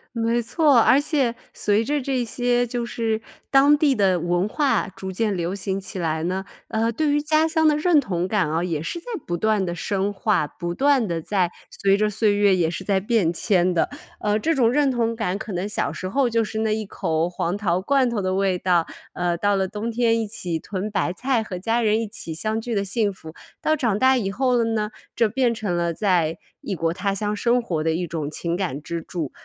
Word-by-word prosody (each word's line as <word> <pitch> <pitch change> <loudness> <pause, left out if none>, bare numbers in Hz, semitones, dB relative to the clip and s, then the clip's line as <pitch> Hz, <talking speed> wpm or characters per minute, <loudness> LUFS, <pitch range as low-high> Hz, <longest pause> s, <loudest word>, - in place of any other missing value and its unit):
没 230 +1 +1
错。 290 +3 +3
而 255 +4 +6
且 275 -6 0 0.2
随 210 +1 +1
着 295 0 0
这 255 -2 -1
些 245 +1 0
就 240 0 -3
是 225 -2 -2 0.3
当 285 +2 +6
地 290 -3 +3
的 190 -4 +2
文 175 +3 0
化 280 -4 +1
逐 190 0 -8
渐 210 +1 0
流 175 +1 -2
行 195 0 -2
起 190 0 -7
来 160 -1 -1
呢， 185 +2 -1 0.3
呃， 225 +1 0
对 295 +5 0
于 295 - +2
家 310 +2 +2
乡 320 0 +1
的 300 -1 +4
认 310 0 +4
同 180 -7 -2
感 190 -6 +1
啊 165 +2 0
也 165 -4 -2
是 255 - -4
在 - - -20 0.2
不 175 0 -2
断 215 0 +1
地 175 - -3
深 195 +3 -1
化， 205 -4 +1
不 175 +2 -5
断 270 +1 +3
地 170 -2 -2
在 180 0 0 0.2
随 195 0 +2
着 210 0 +2
岁 210 0 +2
月 205 -1 +4
也 170 -3 +1
是 175 +3 -5
在 195 -1 +1
变 205 -4 +1
迁 180 0 +2
的。 165 - +1 0.3
呃， 210 0 +1
这 325 +9 +1
种 250 -6 +3
认 280 +1 +3
同 230 -2 0
感， 200 -4 -1
可 215 -1 -6
能 180 +3 -2
小 205 -8 -1
时 185 - -5
候 270 +2 +2
就 230 0 +2
是 220 0 -4
那 220 -1 +1
一 215 -1 -3
口 165 -3 -1
黄 175 0 -2
桃 185 -4 0
罐 265 +3 +2
头 225 -3 -1
的 185 0 -1
味 190 -1 +1
道， 175 -2 +2 0.3
呃， 175 -1 -1
到 205 +2 +2
了 190 -1 0
冬 210 +3 -4
天 230 0 +2
一 220 - -3
起 175 -6 -4
囤 200 +3 -4
白 185 -3 0
菜 255 +5 0
和 195 -4 -6
家 230 +4 0
人 220 0 +2
一 225 - -3
起 200 -6 -6
相 215 +7 -2
聚 230 0 -3
的 200 - +1
幸 200 +1 0
福。 160 -4 -11 0.3
到 310 - +2
长 230 -7 +1
大 260 0 +5
以 205 -5 -1
后 250 +4 +1
了 235 - +3
呢， 210 -1 -1 0.3
这 230 - +3
变 245 0 +1
成 210 -6 -2
了 170 -1 0
在 170 -4 +1 0.2
异 200 - -4
国 165 -1 0
他 195 +3 -1
乡 210 +1 -1
生 240 +3 +2
活 165 -9 -2
的 160 - +1
一 175 +2 -2
种 155 -3 -3
情 170 +2 -2
感 170 -7 -3
支 170 +2 -4
柱。 160 -4 -5
205 Hz, 250 characters per minute, -23 LUFS, 180-235 Hz, 0.3 s, 而